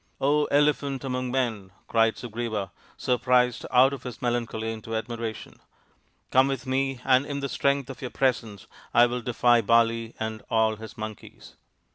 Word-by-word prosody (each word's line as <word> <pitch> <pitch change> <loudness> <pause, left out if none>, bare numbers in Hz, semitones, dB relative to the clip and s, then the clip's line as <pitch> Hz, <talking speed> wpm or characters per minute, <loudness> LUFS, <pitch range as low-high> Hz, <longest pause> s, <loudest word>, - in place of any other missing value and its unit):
" - - -42 0.4
Elephant 140 -2 0
among 130 -1 -2
Men! 115 -7 -1
" - - -38
cried 115 -1 +3
Sugriva, 115 -4 -4 0.3
surprised 125 -1 +1
out 130 +2 +5
of 135 - -6
his 125 -3 -8
melancholy 115 -2 -2
into 110 0 -6
admiration, 115 0 -5 0.4
" - - -41
come 130 +1 +5
with 135 0 -3
me 135 0 -1
and 130 0 +4
in 145 0 -4
the 140 - -2
strength 140 0 0
of 135 - -9
your 125 - -4
presence 115 -7 -1 0.3
I 120 - +8
will 120 +1 -2
defy 120 0 +3
Bali 115 +1 +2
and 110 -1 -4
all 110 -1 +2
his 110 0 -10
monkeys." 110 -1 -9
120 Hz, 165 wpm, -26 LUFS, 110-130 Hz, 0.4 s, I